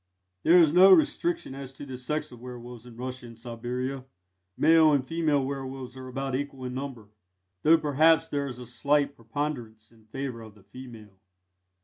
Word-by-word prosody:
There 175 - +6
is 160 -3 +5
no 185 +2 +8
restriction 325 - +2
as 135 -1 -8
to 140 - -9
the 130 -2 -7
sex 140 +5 -3
of 120 - -12
werwolves 125 -1 -10
in 115 -2 -13
Russia 125 0 -6
and 115 -1 -13
Siberia 125 +3 -5 0.5
male 160 0 +6
and 135 -3 +1
female 150 -2 +1
werwolves 135 -2 -6
are 130 0 -9
about 135 +1 -4
equal 135 -1 -4
in 125 - -4
number, 130 -6 -6 0.5
though 165 +7 +6
perhaps 155 +1 +3
there 140 -1 -2
is 125 -3 -7
a 125 - -9
slight 140 +4 +1
preponderance 115 -3 -5
in 110 -2 -23
favour 130 -1 -5
of 110 -2 -12
the 105 - -20
female. 110 -2 -12
130 Hz, 175 wpm, -27 LUFS, 120-145 Hz, 0.5 s, no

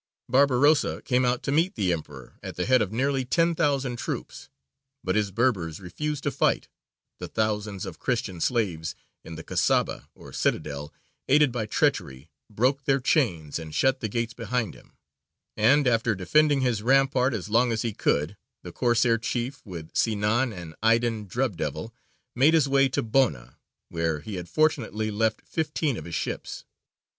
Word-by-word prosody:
Barbarossa 140 +3 +3
came 125 -1 +2
out 125 0 0
to - - -1
meet 165 +6 +2
the 95 -5 +1
emperor 80 -2 -8
at - - -7
the 90 - -2
head 130 -1 +4
of 105 -2 -1
nearly 135 +3 0
ten 165 +7 +2
thousand 140 -6 0
troops; - - -6 0.5
but - - 0
his 105 -2 +1
Berbers 95 -7 0
refused 145 +10 -4
to 145 - 0
fight, - - +1 0.5
the - - -5
thousands 105 -2 -2
of 95 -4 -8
Christian 110 -9 -2
slaves 90 -10 -1 0.3
in 80 - -9
the 80 - -8
Kasaba - - 0
(or - - -13
citadel), 75 -1 -2 0.4
aided 145 0 +4
by 115 -3 -3
treachery, 70 -7 -1 0.2
broke 130 +6 0
their 135 0 +3
chains 90 - 0
and 80 -2 -8
shut 135 0 +2
the 110 - -3
gates 115 +2 -2
behind 115 0 -2
him; - - -18 0.6
and, 135 +7 +4
after 115 -2 +2
defending 145 +9 +3
his 120 -5 0
rampart 135 0 +3
as 105 -1 -5
long 115 +3 +3
as 115 +1 -1
he 115 -2 -2
could, 75 0 0 0.3
the 90 - -8
Corsair 120 +1 +2
chief, 125 +4 -3
with 85 -4 -8
Sinān 115 +3 +1
and 85 -5 -9
Aydīn 115 -1 +2
"Drub 120 +1 -1
Devil," - - -4 0.4
made 145 +6 +5
his 150 -4 +3
way 135 0 +3
to 130 - -1
Bona, 110 - 0 0.3
where 80 -2 -1
he 105 - -8
had 90 -1 -7
fortunately 110 - 0
left 110 +1 0
fifteen 155 -3 -1
of - - -7
his 85 - -5
ships. - - -4
115 Hz, 170 wpm, -26 LUFS, 100-135 Hz, 0.6 s, made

